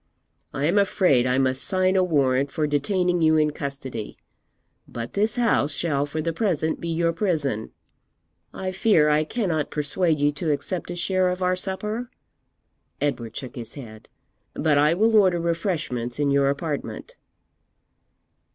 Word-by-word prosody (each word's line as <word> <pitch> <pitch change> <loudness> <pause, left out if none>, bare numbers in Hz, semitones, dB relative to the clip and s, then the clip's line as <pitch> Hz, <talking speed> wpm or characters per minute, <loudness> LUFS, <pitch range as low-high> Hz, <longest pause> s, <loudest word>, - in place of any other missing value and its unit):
I 140 - -2
am 180 +6 +3
afraid 180 -10 +3
I 125 +1 +1
must 130 0 +1
sign 185 0 +2
a 185 - +4
warrant 140 -5 +2
for 155 +2 -1
detaining 175 +4 0
you 160 0 +4
in 150 -1 +2
custody, 135 -6 -6 0.7
but 120 0 -7
this 210 +2 +1
house 230 - +1
shall 145 -4 0
for 155 +2 -4
the 165 0 -1
present 160 -5 -1
be 170 - -4
your 165 0 +1
prison. 150 - -1 0.8
I 185 0 -4
fear 185 -5 +3
I 150 +1 +3
cannot 165 - -2
persuade 150 +2 0
you 145 0 +3
to 150 +3 -3
accept 155 +6 -3
a 175 - -4
share 185 +1 +1
of 180 +1 -3
our 180 0 +2
supper? 210 +6 -4 0.9
(Edward 120 -6 -2
shook 130 +1 -7
his 120 -3 -8
head) 110 -6 -11 0.5
but 155 -1 +2
I 150 +3 +4
will 220 +4 +3
order 185 -5 +4
refreshments 165 - -2
in 145 -1 +1
your 140 0 +3
apartment.' 145 +1 -4
155 Hz, 155 wpm, -24 LUFS, 140-185 Hz, 0.9 s, a